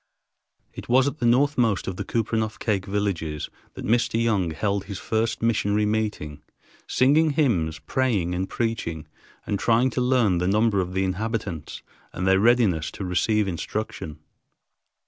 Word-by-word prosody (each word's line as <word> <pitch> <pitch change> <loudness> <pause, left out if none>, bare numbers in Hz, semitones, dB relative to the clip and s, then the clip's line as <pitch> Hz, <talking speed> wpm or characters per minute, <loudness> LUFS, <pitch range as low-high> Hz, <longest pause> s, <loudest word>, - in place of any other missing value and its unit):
It - - -10
was 130 +2 +5
at 145 +2 -3
the 120 - +1
northmost 120 -4 +2
of 95 - -3
the - - -4
Kupreanof 110 -1 -1
Kake 100 -3 -1
villages 95 -7 -2 0.2
that - - -7
Mr. 115 0 +1
Young 105 -7 +1
held 100 +4 -2
his 100 -1 -6
first 110 +2 -1
missionary 105 -2 +1
meeting, 105 -9 -2 0.5
singing 150 +4 +3
hymns, 85 - +1
praying, 95 +1 0
and 95 +2 -2
preaching, 85 -9 -3 0.4
and 100 - -2
trying 120 +3 +3
to 125 - -1
learn 125 -8 +2
the 90 - 0
number 105 0 +2
of 90 0 -5
the 95 - +1
inhabitants 95 -3 -3 0.3
and 90 - -3
their 95 0 +4
readiness 105 -8 +3
to 95 - -5
receive 105 +3 +1
instruction. 100 -2 -4
105 Hz, 150 wpm, -24 LUFS, 90-115 Hz, 0.5 s, was